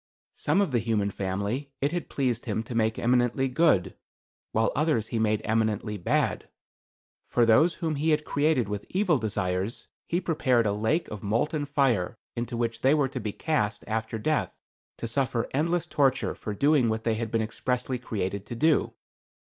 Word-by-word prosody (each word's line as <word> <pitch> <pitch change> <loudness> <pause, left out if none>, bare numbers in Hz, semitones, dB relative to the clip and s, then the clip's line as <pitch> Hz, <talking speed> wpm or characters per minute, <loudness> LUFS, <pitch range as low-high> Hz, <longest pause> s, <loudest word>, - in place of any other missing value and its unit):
Some 200 - +1
of 190 -7 0
the 120 - +2
human 105 -3 0
family 100 +9 -3
it 140 +2 +1
had 175 0 -3
pleased 125 -4 -1
him 110 -1 -1
to 115 - -7
make 110 -1 +1
eminently 125 +2 +2
good, 130 - +2 0.6
while 110 +1 +2
others 150 -7 +1
he 115 - -1
made 110 -1 +1
eminently 110 -1 0
bad. 85 - 0 0.8
For 120 - +3
those 150 +10 +5
whom 160 -4 -2
he 155 +3 +1
had 150 -1 +2
created 145 -5 +1
with 105 0 -5
evil 185 -6 +2
desires, 100 -1 -2 0.2
he 175 - +1
prepared 135 -9 +1
a 100 - +1
lake 110 +11 0
of 105 -2 -7
molten 145 +8 0
fire 125 -8 +1 0.2
into 120 0 -3
which 115 -1 -2
they 135 +3 +4
were 140 -3 +1
to 130 - -5
be 105 -2 -3
cast 105 -7 -1
after 110 0 -2
death 150 +8 -1 0.4
to 115 - -4
suffer 125 -1 0
endless 165 +5 +1
torture 135 -4 +1
for 105 - -6
doing 140 -1 +3
what 110 0 -2
they 115 - +1
had 110 0 -3
been 115 0 0
expressly 125 +3 -2
created 100 -4 -3
to 120 - -5
do. 155 +5 +2
120 Hz, 180 wpm, -27 LUFS, 110-145 Hz, 0.8 s, those